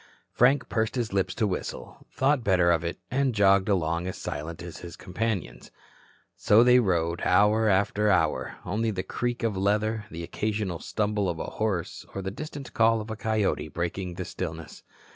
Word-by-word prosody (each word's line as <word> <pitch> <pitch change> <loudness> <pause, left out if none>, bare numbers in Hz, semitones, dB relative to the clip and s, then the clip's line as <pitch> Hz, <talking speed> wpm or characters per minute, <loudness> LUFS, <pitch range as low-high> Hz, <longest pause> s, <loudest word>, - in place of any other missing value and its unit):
Frank 130 +2 +3
pursed 110 +1 -1
his 120 -5 -2
lips 95 -2 0
to 115 - +1
whistle, 95 -3 -5
thought 135 -1 +1
better 90 -4 +4
of 85 -1 +1
it, 85 - -3
and 130 -2 +1
jogged 100 -1 +4
along 85 -2 0
as 95 - -5
silent 80 +4 -5
as 85 -2 -8
his 85 -1 -9
companions. 90 - -4 0.7
So 110 +3 +5
they 125 0 +6
rode 85 -6 0
hour 105 +4 +4
after 100 +2 +2
hour, 95 -3 +1
only 110 +5 0
the 95 -4 -2
creak 120 0 -3
of 110 -3 0
leather, 105 +3 0
the 85 -3 -6
occasional 105 -1 -2
stumble 105 -2 -1
of 85 - -3
a - - -4 0.2
horse 95 -6 -1
or 95 - -3
the 95 - -3
distant 145 +2 -8
call 115 0 +4
of 110 +1 -6
a - - -3
coyote 110 -7 0
breaking 85 +3 -4
the 90 - -4
stillness. 80 -4 -6
100 Hz, 180 wpm, -27 LUFS, 90-110 Hz, 0.7 s, they